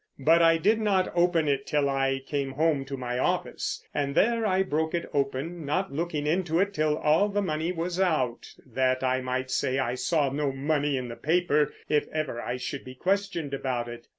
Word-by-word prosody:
But 160 +5 +4
I 165 0 +5
did 215 +7 +2
not 195 -3 +1
open 170 -2 +2
it 140 -1 0
till 145 -1 +1
I 135 -1 0
came 140 -1 -2
home 150 -1 +1
to 135 0 -5
my 125 -1 -3
office, - - -2
and 140 -1 -1
there 230 0 +3
I 190 -1 +2
broke 160 -1 -1
it 170 - -2
open, 140 +4 -2
not 165 +4 -1
looking 155 -1 -2
into 170 +1 +1
it 200 +1 +1
till 155 -4 +1
all 160 +8 +3
the 205 0 -1
money 160 0 -1
was 175 +1 -3
out, 150 -10 0
that 130 0 0
I 130 0 +1
might 130 0 -3
say 130 +1 0
I 125 -3 0
saw 145 +1 +1
no 140 0 -1
money 145 +1 0
in 125 -1 -4
the 115 - -7
paper, 150 -2 +2 0.2
if 150 -1 +1
ever 155 -6 -3
I 125 - -3
should 135 +2 -5
be 130 0 -10
questioned 185 -3 -1
about 130 -3 -2
it. 120 0 -9
150 Hz, 205 wpm, -27 LUFS, 135-170 Hz, 0.2 s, I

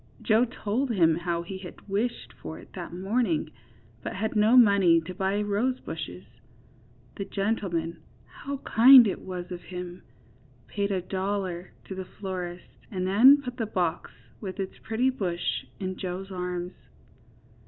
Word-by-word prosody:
Joe 225 +2 +3
told 245 +2 -2
him 170 -8 +4
how 170 0 -2
he 190 +2 -7
had 185 +1 -11
wished 215 +5 -2
for - - -8
it - - -15
that - - -7
morning, 185 -3 0 0.5
but - - -5
had 220 +4 -2
no 215 +4 +5
money 200 -7 +6
to 165 +3 -7
buy 195 +2 0
rosebushes. 205 - -2 0.9
The 195 - -3
gentleman 175 -6 -2 0.2
(how 280 0 -6
kind 250 +2 +9
it 200 - -2
was 180 -1 -6
of 175 -1 -5
him!) 180 0 -7 0.6
paid 200 -1 -2
a 185 -2 -1
dollar 190 -1 -3
to - - -7
the 190 0 -5
florist 180 -3 -5 0.2
and 185 +4 -3
then 255 +9 +7
put 250 -1 -6
the 225 -3 -2
box, 175 -4 -1 0.3
with 195 -1 -6
its 190 -1 -4
pretty 245 +4 +1
bush 180 -8 -2
in 185 -1 -3
Joe's 190 +1 -5
arms. 180 -1 -4
190 Hz, 150 wpm, -27 LUFS, 180-220 Hz, 0.9 s, kind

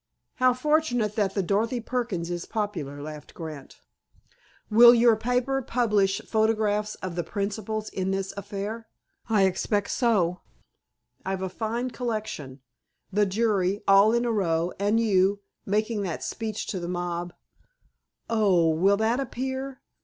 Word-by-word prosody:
"How 255 -2 +4
fortunate 250 -6 +1
that 200 -3 0
the 195 - +1
Dorothy 220 +6 0
Perkins 225 -8 -3
is 175 0 -4
popular!" 165 -10 -4
laughed 150 0 -9
Grant. 155 -5 -9 0.9
"Will 235 +3 +8
your 235 -1 +5
paper 250 +4 0
publish 210 -6 +1
photographs 215 -1 +1
of 185 - -4
the 175 0 -2
principals 210 +3 -3
in 190 0 -3
this 195 0 -2
affair?" 205 +3 -5 0.4
"I 210 -3 +4
expect 200 +2 0
so. 190 -8 +1 0.8
I've 190 0 -3
a 190 - -2
fine 230 +6 -3
collection—the 200 - -4
jury, 200 -2 0
all 195 +2 +6
in 235 +1 +1
a 235 - +1
row—and 195 +2 0
you, 200 -2 +2 0.3
making 215 +2 0
that 180 -5 -4
speech 220 -2 -4
to 190 - -2
the 175 0 -5
mob." 175 -1 -3 0.9
"Oh! 195 -7 +3
Will 190 +6 +3
that 225 +4 +1
appear?" 265 +1 -4
205 Hz, 130 wpm, -26 LUFS, 185-230 Hz, 0.9 s, Will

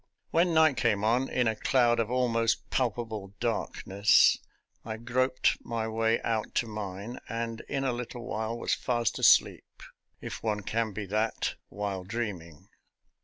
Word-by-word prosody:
When 170 0 +3
night 155 -4 +5
came 105 -2 +1
on, 120 +4 +2
in 125 -2 +1
a 110 - +1
cloud 120 +1 +2
of 115 -1 0
almost 115 -2 0
palpable 110 -5 -2
darkness, 100 +3 +3 0.4
I 110 -1 -5
groped 130 +3 0
my 115 -1 -3
way 115 +1 +1
out 110 -2 -2
to - - +2
mine, 105 +1 -6
and 115 0 -3
in 135 -1 -1
a 130 -2 0
little 120 0 -6
while 110 -1 -3
was - - -1
fast 120 -2 -1
asleep— - - +3 0.4
if - - -7
one 105 -2 -1
can 110 +2 -1
be 105 +1 -5
that 110 +3 -1 0.2
while 100 -2 -4
dreaming. 95 -7 -5
115 Hz, 150 wpm, -29 LUFS, 105-120 Hz, 0.4 s, night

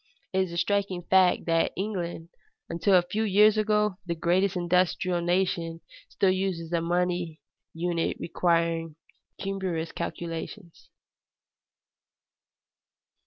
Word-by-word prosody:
It 190 - +2
is 185 -2 0
a 170 - -5
striking 190 0 0
fact 185 0 +3
that 165 -1 +1
England, 175 -4 -4 0.4
until 185 +3 +2
a 180 - +5
few 205 +5 -3
years 210 0 +5
ago 210 -2 +1
the 170 -2 -3
greatest 180 +4 +1
industrial 180 0 +1
nation, 170 -2 0 0.3
still 195 -2 +2
uses 185 -3 -2
a 170 - +2
money 175 -1 -1 0.3
unit 170 0 -1
requiring 165 -2 0 0.4
cumbrous 190 -4 -3
calculations. 170 +2 -6
175 Hz, 110 wpm, -27 LUFS, 170-190 Hz, 0.4 s, a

